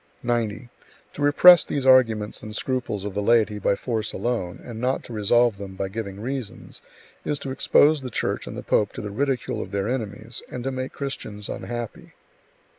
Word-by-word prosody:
90. 120 -1 -1 0.5
To - - -7
repress 170 +4 +8
these 140 -2 -3
arguments 115 -5 +4
and 110 0 -8
scruples 125 -5 -2
of 105 - -4
the 105 - -1
laity 110 -1 +3
by 100 - +2
force 110 -1 -2
alone, 115 -8 -2
and 115 -2 -7
not 130 +2 0
to 120 - -9
resolve 115 0 +3
them 95 -1 -7
by 95 0 -3
giving 100 -1 -5
reasons, 125 -1 -6 0.4
is 150 - -1
to 135 - -5
expose 145 +3 +4
the 130 - -5
Church - - -2
and - - -6
the - - -6
pope 105 - +1
to - - -6
the 105 - -5
ridicule 135 +2 -1
of - - -6
their 100 0 -2
enemies, 115 -1 -4
and 125 - -5
to 135 - -2
make 130 0 -4
Christians 105 -7 -5
unhappy. 120 -2 -6
115 Hz, 190 wpm, -24 LUFS, 105-130 Hz, 0.5 s, repress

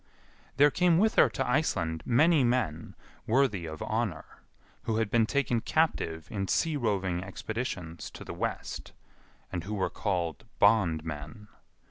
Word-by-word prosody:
There 145 +1 +6
came 175 0 +3
with 215 +4 +3
her - - +5
to 135 - -2
Iceland 85 - 0
many 150 +5 +4
men 115 -11 -1 0.3
worthy 110 -8 +2
of 80 0 -6
honour, 110 -8 -3 0.4
who 110 - 0
had 110 -2 0
been 115 -2 +3
taken 125 -3 +1
captive 110 - 0
in 95 -2 -2
sea 160 - +1
roving 95 -8 -1
expeditions 95 -4 -5
to - - -10
the - - -6
west, - - -4 0.6
and 85 -2 -3
who 105 +4 -4
were 95 - -1
called 90 -2 -2
bondmen. 80 -1 +1
105 Hz, 140 wpm, -29 LUFS, 85-130 Hz, 0.6 s, There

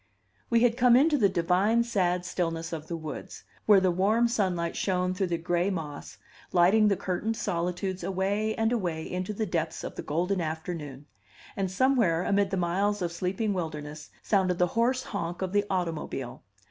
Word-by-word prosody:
We 235 -1 +3
had 240 -1 +3
come 245 -1 +6
into 295 +4 +5
the 210 -8 +4
divine, 190 +6 +2
sad 180 -6 0
stillness 165 -2 -2
of 155 -1 -5
the 170 - -4
woods, 155 -1 -8 0.2
where 205 -2 +7
the 185 -1 +2
warm 210 +7 +2
sunlight 185 -7 -1
shone 180 -1 0
through 185 0 -1
the 170 -1 -1
gray 175 +2 0
moss, 155 -6 -6 0.3
lighting 195 +5 +5
the 200 - +3
curtained 200 +5 -2
solitudes 180 0 -2
away 195 +4 -1
and 225 0 +1
away 175 -9 -1
into 185 +4 -4
the 215 +1 -2
depths 165 -4 -2
of - - -5
the - - -3
golden 180 +5 -1
afternoon; 155 -3 -5 0.5
and 195 -1 -1
somewhere 195 -5 +2
amid 200 0 +2
the 190 - -2
miles 190 +3 0
of 170 - -1
sleeping 190 +5 -1
wilderness 155 -4 -5
sounded 185 -3 +2
the 180 0 +2
hoarse 250 +3 +1
honk 175 -2 -4
of 185 - -2
the 205 0 +2
automobile. 165 -8 -3
185 Hz, 175 wpm, -28 LUFS, 170-205 Hz, 0.5 s, where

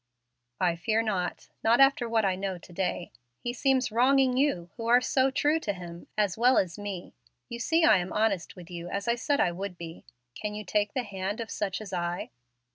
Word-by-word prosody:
"I 175 -2 +2
fear 220 +6 +1
not 190 -5 -2
not 230 +2 +4
after 270 -3 +4
what 225 -2 +2
I 190 -1 +2
know 190 -1 -3
to 175 +1 -15
day. 180 -1 -2 0.3
He 240 - -4
seems 260 -2 +1
wronging 255 +2 +4
you 250 -11 +1
who 230 - -5
are 240 +1 +6
so 260 +1 +2
true 295 +4 +2
to 205 -10 -2
Him, 175 -2 -9
as 205 -1 +1
well 250 +2 +5
as 185 0 0
me. 200 -3 -6 0.4
You 235 -1 -6
see 325 +8 +2
I 320 - +7
am 180 0 -3
honest 210 -5 0
with 180 -1 -12
you, 175 0 -6
as 200 +2 -3
I 235 - +4
said 280 +4 0
I 175 - +3
would 180 +1 -5
be. 165 -1 -9 0.3
Can 210 - -5
you 210 0 -6
take 210 +2 0
the 255 - 0
hand 200 0 -4
of 225 -2 -5
such 195 -2 -2
as 215 -3 -8
I?" 175 0 -2
210 Hz, 215 wpm, -28 LUFS, 180-240 Hz, 0.4 s, I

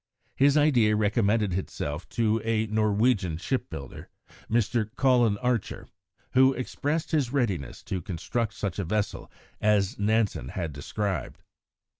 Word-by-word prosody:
His 140 +2 +4
idea 125 -8 +4
also 105 - 0
recommended 105 -1 +2
itself 80 -4 -4
to 115 -1 +1
a 110 -1 +1
Norwegian 105 -4 +1
shipbuilder, 85 - -5 0.4
Mr. 115 -1 +1
Colin 120 -6 +3
Archer, 125 -3 -2 0.5
who 130 +1 +5
expressed 145 +5 -2
his 145 -7 +1
readiness 115 - -2
to 95 - -3
construct 100 +6 -3
such 100 -2 -3
a - - 0
vessel 105 +4 -2 0.3
as 105 -3 +2
Nansen 105 - +1
had 85 -2 -4
described. 95 +3 -4
110 Hz, 125 wpm, -27 LUFS, 95-120 Hz, 0.5 s, who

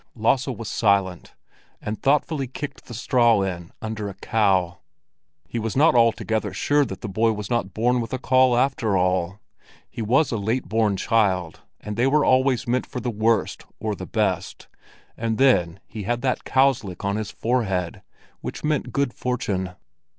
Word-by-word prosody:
Lasse 125 +4 +1
was 115 -4 -5
silent, 100 -5 0 0.4
and 105 0 -5
thoughtfully 140 0 +1
kicked 140 +1 -7
the 120 - -10
straw 120 -3 +3
in 85 -3 -4
under 110 -2 -4
a 95 - -9
cow. 95 -5 +1 0.7
He 120 - -3
was 110 -1 -3
not 155 +4 +5
altogether 115 -2 +1
sure 145 0 +2
that 120 - -7
the 120 - -4
boy 110 +3 +1
was 105 0 -6
not 110 -6 -1
born 120 +2 +2
with 115 - -6
a 130 - -1
caul, 130 -1 +3
after 120 -6 +1
all. 90 +1 0 0.5
He - - -6
was 130 +8 +2
a 115 - -1
late 110 +6 -1
born 110 -3 +1
child, 95 -6 +1 0.2
and 105 0 -6
they 120 +3 +3
were 150 +2 +3
always 130 -1 +2
meant 125 +2 0
for 125 - -5
the 125 -1 -2
worst 110 -1 0
or - - -2
the - - -7
best; - - -2 0.5
and 110 -1 -2
then 95 -10 +3
he 110 - -8
had 120 +4 -2
that 130 -2 -1
cow's 135 -1 +3
lick 95 -1 -7
on 100 0 0
his 110 -1 -3
forehead, 100 -8 -1 0.4
which - - -7
meant 150 -1 -1
good 140 -3 0
fortune. 100 -8 -2
115 Hz, 175 wpm, -23 LUFS, 100-125 Hz, 0.7 s, not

